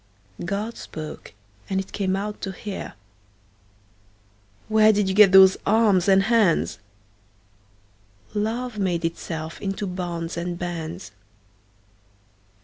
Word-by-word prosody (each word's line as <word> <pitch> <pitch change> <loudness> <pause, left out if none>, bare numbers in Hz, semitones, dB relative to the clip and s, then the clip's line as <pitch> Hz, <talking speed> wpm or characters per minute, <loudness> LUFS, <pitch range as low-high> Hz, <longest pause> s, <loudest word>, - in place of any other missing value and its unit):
God 200 +6 -3
spoke, 155 -8 -8 0.4
and 190 - 0
it 190 - -6
came 190 -2 -1
out 205 +2 -4
to 195 - -4
hear. 195 +1 -7 1.7
Where 220 0 +5
did 205 -2 +1
you 190 - 0
get 205 -1 +7
those 190 0 +8
arms 205 -4 +3
and 195 0 +5
hands? 205 - +2 1.5
Love 220 +2 -2
made 175 -4 0
itself 160 -1 -5
into 195 +1 -3
bonds 175 -2 -4
and 175 0 -3
bands. 175 0 -6
190 Hz, 110 wpm, -23 LUFS, 175-210 Hz, 1.7 s, those